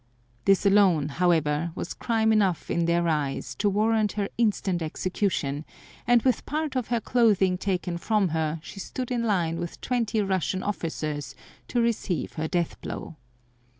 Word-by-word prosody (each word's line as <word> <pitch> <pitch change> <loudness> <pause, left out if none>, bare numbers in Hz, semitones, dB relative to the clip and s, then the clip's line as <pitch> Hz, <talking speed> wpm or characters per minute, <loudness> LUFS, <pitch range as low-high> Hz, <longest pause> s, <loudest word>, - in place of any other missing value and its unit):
This 195 0 +4
alone, 190 -7 +4
however, 165 -1 +1
was - - -4
crime 220 -2 +1
enough 195 -6 +1
in 170 0 +1
their 170 0 +2
eyes 140 -5 -1
to 205 - +3
warrant 215 +1 +2
her 205 -1 -2
instant 200 -6 +1
execution, 160 -3 -1 0.4
and 240 -1 +5
with 255 -2 +2
part 305 -1 -2
of 255 -3 -1
her 240 -1 +1
clothing 210 -6 +3
taken 180 -2 -2
from 210 -1 +1
her 160 0 -1
she 195 - -9
stood 255 +5 -5
in 240 -1 0
line 175 -7 0
with 170 -1 -5
twenty 235 -3 0
Russian 190 -1 -1
officers 155 -7 -3 0.3
to 245 - 0
receive 205 - -1
her 160 0 -2
death 175 0 -2
blow. 160 - -6
190 Hz, 155 wpm, -26 LUFS, 165-220 Hz, 0.4 s, and